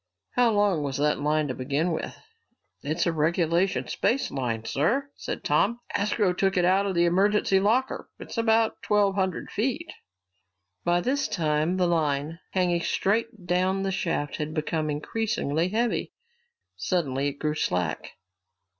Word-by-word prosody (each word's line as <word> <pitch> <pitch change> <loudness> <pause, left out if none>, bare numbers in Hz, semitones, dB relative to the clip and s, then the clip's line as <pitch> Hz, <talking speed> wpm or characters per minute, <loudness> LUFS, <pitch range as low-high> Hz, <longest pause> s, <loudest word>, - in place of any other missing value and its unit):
"How 245 -1 +3
long 205 -6 +2
was 140 -2 -2
that 150 +1 +1
line 150 +1 +1
to 130 - -2
begin 140 +7 -1
with?" 160 - -4 0.6
"It's 155 +4 -1
a 170 - +1
regulation 170 +4 +1
space 270 +3 0
line, 115 -4 -2
sir," 255 - 0
said - - -5
Tom. 235 +1 +2
"Astro 200 -2 +1
took 195 +1 +1
it 175 - +3
out 195 +2 +3
of 190 - -2
the 170 0 +4
emergency 195 +2 +3
locker. 235 +7 0
It's - - -9
about 225 -1 +2
twelve 205 -2 +2
hundred 190 -2 -2
feet." 270 +9 -2 0.9
By 175 0 +2
this 270 +6 0
time 155 +1 0
the 180 - +2
line, 155 -1 0
hanging 175 -2 +1
straight 215 +2 -1
down 185 +2 +1
the 195 - -1
shaft, 165 -6 -2
had 155 +1 -4
become 155 0 -1
increasingly 165 0 -1
heavy. 230 +4 -1 0.6
Suddenly 140 -7 -1
it 140 0 -4
grew 150 0 -1
slack. 90 - -2
175 Hz, 150 wpm, -26 LUFS, 150-205 Hz, 0.9 s, the